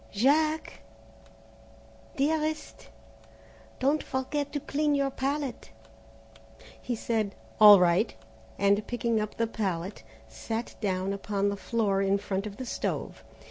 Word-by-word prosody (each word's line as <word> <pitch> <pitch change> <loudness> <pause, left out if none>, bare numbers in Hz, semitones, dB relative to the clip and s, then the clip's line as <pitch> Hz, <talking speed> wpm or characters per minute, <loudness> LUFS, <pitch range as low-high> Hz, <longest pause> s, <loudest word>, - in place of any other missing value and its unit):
"Jack?" 305 +8 +1 1.3
"Dearest?" 310 +2 -1 0.9
"Don't 285 +4 +2
forget 280 +2 -3
to 290 - -2
clean 295 +1 0
your 275 -1 +1
palette." 275 - -3 1.1
He 245 - -2
said, 220 -3 -1 0.2
"All 210 -2 +10
right," 180 +5 +2 0.4
and 200 +1 +2
picking 235 -2 0
up 210 - -5
the 230 - +2
palette, 195 - -3 0.3
sat 225 - -5
down 190 -1 -1
upon 200 0 -1
the 200 - -2
floor 200 -1 0
in 195 0 +2
front 200 0 -3
of 200 - -9
the 260 - -5
stove. - - -4
225 Hz, 120 wpm, -28 LUFS, 200-275 Hz, 1.3 s, All